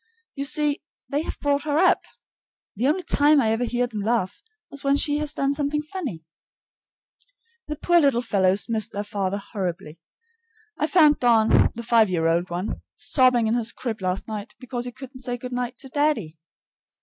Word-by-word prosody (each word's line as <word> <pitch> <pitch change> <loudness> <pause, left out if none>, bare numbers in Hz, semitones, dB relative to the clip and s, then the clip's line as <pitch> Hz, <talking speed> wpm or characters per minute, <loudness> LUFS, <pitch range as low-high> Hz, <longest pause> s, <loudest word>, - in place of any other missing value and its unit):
You 275 -1 -3
see, 295 0 +1 0.3
they 290 +1 0
have - - -5
brought 285 0 +1
her 295 0 -1
up. 360 +2 +3 0.7
The 235 +6 0
only 350 +6 +1
time 295 -1 +4
I 225 -5 +2
ever 225 +2 0
hear 245 +1 0
them 220 -4 -5
laugh 225 - -1 0.3
is 280 - -5
when 275 0 +3
she 290 0 +2
has 300 -1 -1
done 275 -2 +1
something 295 +1 -1
funny. 295 - -6 1.4
The 300 - -3
poor 345 +3 +3
little 275 -6 +2
fellows 195 -3 +1
miss 220 -2 -1
their 205 -2 -4
father 200 -1 -2
horribly. 185 -6 -5 0.8
I 305 - 0
found 305 -3 +5
Don, 230 -3 +4
the 235 - -6
five 225 -2 +4
year 170 -3 0
old 170 +2 +1
one, 175 +4 -4
sobbing 255 -3 +3
in 220 - +1
his 235 -1 0
crib 225 -5 -5
last 185 +1 -2
night 215 0 -6
because 245 -1 -4
he 245 - -5
couldn't 260 +1 -11
say 245 -1 -3
good 250 +1 -7
night 245 0 -3
to 270 - -7
"daddy." 260 - 0
245 Hz, 185 wpm, -24 LUFS, 210-285 Hz, 1.4 s, found